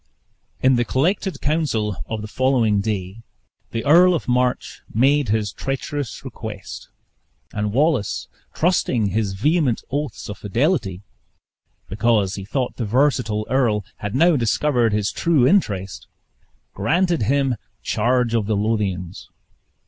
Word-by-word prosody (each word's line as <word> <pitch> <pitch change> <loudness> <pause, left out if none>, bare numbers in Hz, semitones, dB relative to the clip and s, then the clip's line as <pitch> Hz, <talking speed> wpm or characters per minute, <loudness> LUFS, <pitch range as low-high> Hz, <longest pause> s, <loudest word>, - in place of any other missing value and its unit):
In 130 -1 +5
the 120 - +2
collected 180 - -1
council 140 - 0
of 110 -1 -4
the - - -5
following 115 -4 +2
day, 100 0 -4 0.5
the 115 - -4
Earl 175 +5 +6
of 160 - -4
March 125 0 0
made 135 +3 +2
his 105 -1 0
treacherous 135 0 -4
request; 110 -5 -8 0.6
and 105 0 -2
Wallace, 135 -3 +1 0.2
trusting 130 - +1
his 100 0 -1
vehement 140 - +1
oaths 145 -4 -3
of 105 - -7
fidelity 110 - 0 0.8
(because 100 -1 +1
he 100 -1 -6
thought 125 +4 -2
the 120 - -2
versatile 120 -3 +1
earl 115 -7 +1
had 105 +1 -5
now 170 +4 +4
discovered 120 -1 +1
his 105 -1 0
true 160 -7 +2
interest), 95 - 0 0.7
granted 175 -2 +1
him 135 +3 +1 0.3
charge 120 +1 +1
of 110 -3 0
the 110 - +1
Lothians. 100 -4 -2
120 Hz, 125 wpm, -21 LUFS, 105-140 Hz, 0.8 s, Earl